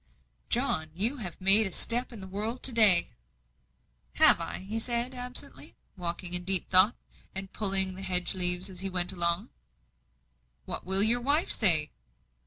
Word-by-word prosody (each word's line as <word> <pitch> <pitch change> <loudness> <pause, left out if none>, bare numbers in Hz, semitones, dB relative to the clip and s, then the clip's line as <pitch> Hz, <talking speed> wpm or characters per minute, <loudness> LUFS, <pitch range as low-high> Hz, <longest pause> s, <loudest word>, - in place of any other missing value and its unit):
"John, 160 0 -3
you 225 +10 +2
have 180 -9 -10
made 200 +3 +3
a - - -11
step 240 +7 -1
in 225 -4 -13
the 190 - -12
world 215 +6 -8
to 265 - +3
day." 215 -7 +3 1.0
"Have - - +2
I?" - - -8
he 220 +2 -6
said, 240 +2 -4
absently, 250 0 -4 0.2
walking 175 0 -6
in 180 0 +2
deep 190 -1 +1
thought, 190 +5 +4 0.4
and 195 0 -9
pulling 195 -2 +5
the 190 - -11
hedge 180 -2 -1
leaves 180 0 +3
as 185 -3 -12
he 195 +1 -5
went 180 0 -1
along. 170 +1 -3 1.2
"What - - -8
will 190 +1 +5
your 235 +3 +3
wife 290 +6 -2
say?" 160 -8 +3
195 Hz, 165 wpm, -25 LUFS, 180-225 Hz, 1.2 s, pulling